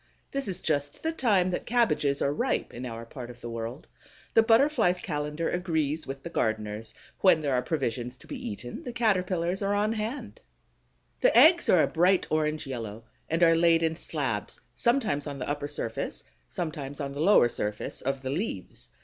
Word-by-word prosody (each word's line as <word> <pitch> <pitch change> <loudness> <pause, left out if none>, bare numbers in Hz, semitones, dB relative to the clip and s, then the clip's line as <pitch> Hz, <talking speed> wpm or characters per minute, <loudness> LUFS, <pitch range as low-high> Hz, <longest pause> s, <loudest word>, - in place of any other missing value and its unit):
This 275 -4 -1
is 185 -1 -3
just 145 -2 -1
the 320 - +1
time 205 - +2
that 175 - -3
cabbages 220 - +2
are 140 - +1
ripe - - -1
in 125 +2 -5
our 115 0 -7
part 125 0 -8
of 120 0 -11
the 120 -1 -7
world. 115 +4 -5 0.5
The 225 - +7
Butterfly's 225 -5 +3
calendar 150 -1 -2
agrees 160 -4 -1
with 135 0 -6
the 170 - -5
gardener's. 110 -3 -1 0.2
When 185 -5 +5
there 140 -2 0
are 125 - +2
provisions 125 -4 -2
to - - -17
be - - -6
eaten, 120 +4 -6
the 245 - -6
Caterpillars 185 -5 +1
are 200 0 +1
on 210 +2 +1
hand. 225 - -5 0.8
The - - +4
eggs 340 +2 +7
are 175 - +6
a - - +2
bright 180 +3 +3
orange 155 0 0
yellow 115 -4 -6 0.3
and 165 +2 +2
are 165 -1 +6
laid 165 0 +4
in 160 0 +1
slabs, - - -3
sometimes 235 - +1
on 140 -1 -5
the 125 - -5
upper 145 0 -2
surface, 115 -6 -4 0.3
sometimes 150 -4 -5
on 140 -2 -3
the 140 +2 -5
lower 185 -7 +6
surface 105 -2 -3
of 135 0 -2
the 130 - -2
leaves. 155 - -4
155 Hz, 185 wpm, -28 LUFS, 130-190 Hz, 0.8 s, The